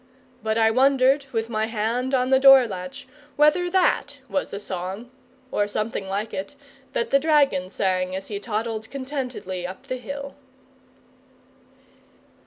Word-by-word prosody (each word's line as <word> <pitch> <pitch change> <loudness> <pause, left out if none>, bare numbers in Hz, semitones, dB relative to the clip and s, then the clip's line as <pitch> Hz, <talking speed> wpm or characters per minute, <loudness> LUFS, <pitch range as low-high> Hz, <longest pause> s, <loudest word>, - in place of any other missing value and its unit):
But 220 0 -1
I 225 -1 +4
wondered, 270 +2 +3
with 225 -2 -1
my 220 -1 -1
hand 235 +4 -1
on 255 0 +1
the 265 - +6
door 270 -1 +8
latch, 185 +2 -7 0.3
whether 300 +4 +3
that 290 -6 +1
was 285 - -2
the - - -5
song, 195 +4 -5 0.4
or 205 - +1
something 210 -1 -3
like 205 +3 -3
it, 285 - -5 0.4
that 470 -2 -1
the 275 - +5
dragon 280 - +2
sang 185 -1 -1
as 190 0 -5
he 205 -2 -4
toddled 220 0 -3
contentedly 255 -10 -4
up 185 +8 -10
the 255 -1 -3
hill. 280 +2 -7
235 Hz, 145 wpm, -24 LUFS, 205-275 Hz, 0.4 s, door